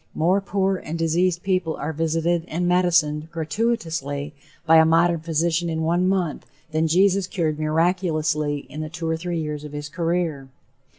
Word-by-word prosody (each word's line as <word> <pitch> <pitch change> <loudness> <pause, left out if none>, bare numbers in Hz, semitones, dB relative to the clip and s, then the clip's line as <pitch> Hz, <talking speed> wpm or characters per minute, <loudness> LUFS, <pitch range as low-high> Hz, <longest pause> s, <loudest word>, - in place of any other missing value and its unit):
More 180 +5 +2
poor 195 -1 0
and 165 -2 -6
diseased 170 +2 +1
people 185 -4 0
are 160 - -4
visited 165 +2 0
and 175 +3 -1
medicined 170 -4 +2
gratuitously 160 - -2 0.3
by 165 0 +6
a 160 - +8
modern 165 +1 +3
physician 165 +1 0
in 160 0 -2
one 175 +3 +2
month, 180 -6 -1 0.2
than 160 +1 +1
Jesus 190 +3 +3
cured 160 -5 -1
miraculously 155 -2 0
in 155 - -7
the 155 - -5
two 165 +1 -5
or 160 - +1
three 170 +1 -3
years 150 -1 -4
of 150 -1 -9
his 145 0 -5
career. 165 -5 -2
165 Hz, 165 wpm, -23 LUFS, 155-175 Hz, 0.3 s, a